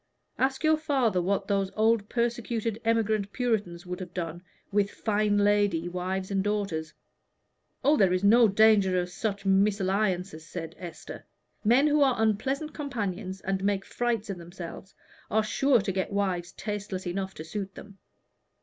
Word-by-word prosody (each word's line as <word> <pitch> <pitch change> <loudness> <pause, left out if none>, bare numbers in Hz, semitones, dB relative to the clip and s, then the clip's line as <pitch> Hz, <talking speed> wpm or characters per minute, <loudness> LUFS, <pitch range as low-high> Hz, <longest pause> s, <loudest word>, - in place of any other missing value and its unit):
Ask 265 +2 +1
your 310 0 +4
father 265 - +1
what 195 +2 0
those 195 -2 +1
old 220 -1 +2
persecuted 235 -2 -1
emigrant 220 -3 +1
Puritans 210 -9 -1
would 180 +1 -5
have 180 -2 -8
done 175 -1 -4 0.3
with 200 0 +2
fine 210 -1 0
lady 205 -4 +2
wives 185 +2 -3
and 195 -1 +1
daughters." 195 -7 -2 0.9
"Oh, 290 +3 +4
there 190 -6 +4
is 185 +1 0
no 225 +3 +7
danger 200 -3 +4
of 180 0 -3
such 200 0 -3
mésalliances," 195 -3 +1
said 165 +1 -7
Esther. 170 -3 -8 0.4
"Men 240 +6 +5
who 300 0 +3
are 265 -3 +4
unpleasant 265 +8 0
companions 205 - -4
and 190 0 -2
make 195 -1 0
frights 230 -4 -1
of 185 - -6
themselves, 175 +2 -9 0.3
are 220 +1 +2
sure 255 +2 +3
to 195 - -2
get 190 +1 -2
wives 185 -4 -1
tasteless 205 -3 -5
enough 190 +2 -3
to 155 - -7
suit 195 +4 -5
them." 200 -1 -12
200 Hz, 155 wpm, -28 LUFS, 185-225 Hz, 0.9 s, no